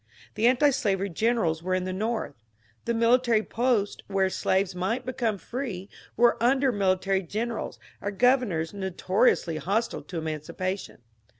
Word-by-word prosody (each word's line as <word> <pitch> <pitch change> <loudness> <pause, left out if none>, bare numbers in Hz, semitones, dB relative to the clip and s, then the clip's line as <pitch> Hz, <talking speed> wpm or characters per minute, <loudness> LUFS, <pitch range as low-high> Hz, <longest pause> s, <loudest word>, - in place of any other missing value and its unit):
The 225 - +2
antislavery 240 -7 +2
generals 175 -5 +1
were 185 +2 0
in 185 - -1
the 185 0 -3
North; 220 -1 -2 0.5
the 235 - 0
military 230 -1 +3
posts 230 -4 0
where 195 -1 +1
slaves 190 0 +1
might 195 +8 -2
become 235 -4 -1
free 205 -2 -5 0.3
were 240 -1 +4
under 265 +2 +3
military 195 -2 +1
generals 220 +6 -4 0.2
or 200 - -2
governors 205 -7 +2
notoriously 190 -2 +1
hostile 200 +9 -1
to 180 - -7
emancipation.. 160 +1 -4
200 Hz, 130 wpm, -27 LUFS, 185-235 Hz, 0.5 s, were